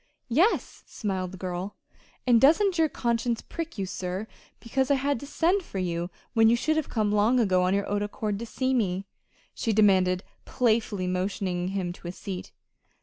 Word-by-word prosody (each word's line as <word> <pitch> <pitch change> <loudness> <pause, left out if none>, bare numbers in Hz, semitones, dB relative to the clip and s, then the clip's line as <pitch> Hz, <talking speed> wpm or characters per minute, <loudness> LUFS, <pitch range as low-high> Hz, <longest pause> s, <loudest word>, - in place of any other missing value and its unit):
"Yes," 335 - +1
smiled 190 -4 -3
the 190 - -9
girl. 185 +2 -4 0.5
"And 240 -3 +5
doesn't 345 +5 +4
your 320 -1 +4
conscience 235 -2 -1
prick 330 -4 -6
you, 195 - -1
sir, 185 +1 -4 0.3
because 260 +2 -1
I 280 - +5
had 275 -1 0
to 285 - -9
send 350 +7 +2
for 270 - -8
you, 175 -1 -2 0.2
when 225 -1 +5
you 235 - +5
should 310 +6 +1
have 315 -2 -1
come 215 -3 0
long 210 +5 +3
ago 185 -5 +3
of 190 - +2
your 200 - 0
own 205 0 0
accord 205 0 -3
to 235 - -5
see 260 +3 -1
me?" 195 -6 0 0.5
she 225 - -1
demanded 190 -3 +4 0.2
playfully, 220 -5 +1
motioning 180 -1 -1
him 185 -2 -2
to 175 - -11
a - - -3
seat. 185 0 -7
210 Hz, 185 wpm, -27 LUFS, 185-250 Hz, 0.5 s, And